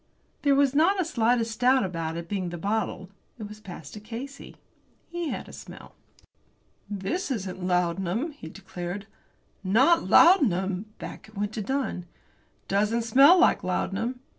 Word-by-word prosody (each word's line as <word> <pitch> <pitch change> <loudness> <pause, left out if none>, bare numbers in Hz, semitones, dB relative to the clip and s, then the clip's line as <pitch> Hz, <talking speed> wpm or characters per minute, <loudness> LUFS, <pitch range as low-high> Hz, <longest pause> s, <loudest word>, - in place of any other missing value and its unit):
There 285 -1 +3
was 275 -1 +3
not 335 +7 +3
the 370 - 0
slightest 230 -5 0
doubt 255 +1 +4
about 165 -3 -4
its 170 0 -6
being 185 -2 -3
the 175 - -6
bottle. 195 0 -2 0.3
It 215 -3 -7
was 210 +1 -11
passed 175 -8 -10
to 210 - -8
Casey. 240 +6 -9 0.5
He 345 -2 -3
had - - -5
a - - -12
smell. - - -11 1.0
"This 210 - -3
isn't 190 -7 -4
laudanum," 180 - 0
he 220 - -10
declared. 190 +1 -7 0.6
"Not 265 - +4
laudanum!" 200 - +4
Back 195 - -9
it 215 - -16
went 205 +1 -2
to 220 - -3
Dunn. 255 -7 -3 0.6
"It - - -40
doesn't 210 +4 +1
smell 275 +10 +7
like 360 - +4
laudanum." 225 +7 -2
215 Hz, 155 wpm, -26 LUFS, 185-265 Hz, 1.0 s, smell